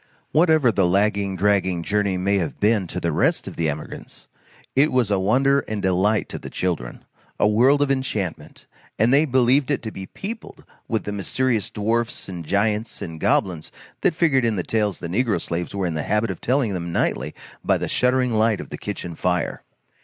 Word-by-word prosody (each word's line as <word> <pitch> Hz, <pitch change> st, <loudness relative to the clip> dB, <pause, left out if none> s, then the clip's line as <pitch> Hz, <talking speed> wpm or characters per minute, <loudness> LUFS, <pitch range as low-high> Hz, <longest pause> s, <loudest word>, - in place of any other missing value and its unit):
Whatever 155 Hz, -6 st, +4 dB
the 95 Hz, -4 st, +2 dB
lagging 100 Hz, +1 st, +1 dB
dragging 95 Hz, -3 st, +1 dB
journey 100 Hz, -1 st, 0 dB
may 100 Hz, +2 st, +1 dB
have 85 Hz, -4 st, -4 dB
been 105 Hz, -3 st, +2 dB
to -, -, -4 dB
the 85 Hz, -, -1 dB
rest -, -, +1 dB
of -, -, -7 dB
the 80 Hz, -2 st, 0 dB
emigrants, 75 Hz, +1 st, -7 dB, 0.5 s
it 145 Hz, +4 st, +4 dB
was 125 Hz, -5 st, +1 dB
a 100 Hz, -, +2 dB
wonder 135 Hz, +8 st, +3 dB
and 110 Hz, -1 st, -3 dB
delight 95 Hz, +3 st, +1 dB
to -, -, -5 dB
the -, -, -8 dB
children, 85 Hz, -10 st, -3 dB, 0.3 s
a -, -, +4 dB
world 130 Hz, +7 st, +4 dB
of 140 Hz, -, 0 dB
enchantment; 110 Hz, -10 st, -3 dB, 0.3 s
and 115 Hz, +4 st, +3 dB
they 145 Hz, +3 st, +5 dB
believed 130 Hz, 0 st, +3 dB
it 145 Hz, -, 0 dB
to 110 Hz, -, -4 dB
be 95 Hz, -2 st, -8 dB
peopled 220 Hz, +3 st, -8 dB, 0.2 s
with 110 Hz, -2 st, -1 dB
the 105 Hz, -, -4 dB
mysterious 110 Hz, +2 st, -1 dB
dwarfs 115 Hz, +3 st, -1 dB
and 90 Hz, -3 st, -7 dB
giants 105 Hz, +5 st, 0 dB
and 80 Hz, -1 st, -7 dB
goblins 85 Hz, -2 st, 0 dB, 0.3 s
that -, -, +2 dB
figured 155 Hz, -7 st, +3 dB
in 115 Hz, -2 st, +1 dB
the 90 Hz, -, -2 dB
tales 105 Hz, -2 st, 0 dB
the 85 Hz, -, -6 dB
negro 105 Hz, +2 st, 0 dB
slaves 85 Hz, +3 st, -4 dB
were 100 Hz, -1 st, -1 dB
in 85 Hz, -, -1 dB
the 80 Hz, -, -2 dB
habit 105 Hz, +5 st, 0 dB
of 90 Hz, -, -8 dB
telling 125 Hz, -4 st, +1 dB
them 85 Hz, -2 st, -4 dB
nightly -, -, -1 dB, 0.3 s
by -, -, +2 dB
the -, -, -3 dB
shuddering 125 Hz, -1 st, +2 dB
light 110 Hz, -2 st, +2 dB
of -, -, -8 dB
the -, -, -6 dB
kitchen 85 Hz, -, -5 dB
fire. 90 Hz, 0 st, -1 dB
105 Hz, 200 wpm, -22 LUFS, 90-125 Hz, 0.5 s, they